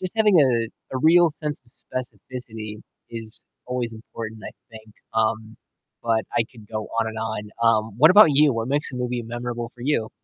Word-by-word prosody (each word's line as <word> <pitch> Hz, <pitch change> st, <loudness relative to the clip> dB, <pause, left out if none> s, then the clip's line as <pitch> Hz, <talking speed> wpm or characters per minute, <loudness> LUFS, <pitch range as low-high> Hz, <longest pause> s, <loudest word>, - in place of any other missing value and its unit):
Just 185 Hz, -1 st, -1 dB
having, 215 Hz, -2 st, +4 dB
uh, 120 Hz, -4 st, +2 dB, 0.3 s
a -, -, +1 dB
a -, -, -1 dB
real 170 Hz, +1 st, +6 dB
sense 150 Hz, -1 st, -5 dB
of 120 Hz, -, -25 dB
specificity 120 Hz, -4 st, -7 dB, 0.3 s
is 115 Hz, -1 st, -4 dB, 0.2 s
always 125 Hz, -2 st, -2 dB
important, 110 Hz, 0 st, -8 dB
I -, -, -8 dB, 0.2 s
think. 110 Hz, -1 st, -13 dB, 0.2 s
Um, 110 Hz, 0 st, 0 dB, 0.5 s
but 115 Hz, -1 st, +1 dB
I 115 Hz, -, +3 dB
could 110 Hz, -4 st, -15 dB
go 110 Hz, -1 st, -3 dB
on 115 Hz, -, 0 dB
and 110 Hz, 0 st, -6 dB
on. 110 Hz, -1 st, -3 dB, 0.2 s
Um, 110 Hz, -1 st, +3 dB
what 155 Hz, +6 st, +8 dB
about 205 Hz, -1 st, +9 dB
you? 145 Hz, 0 st, +5 dB
What 115 Hz, +1 st, -2 dB
makes 145 Hz, +2 st, 0 dB
a -, -, -5 dB
movie 125 Hz, -1 st, -2 dB
memorable 120 Hz, 0 st, -5 dB
for 120 Hz, -, -12 dB
you? 125 Hz, -5 st, 0 dB
120 Hz, 195 wpm, -24 LUFS, 110-130 Hz, 0.5 s, about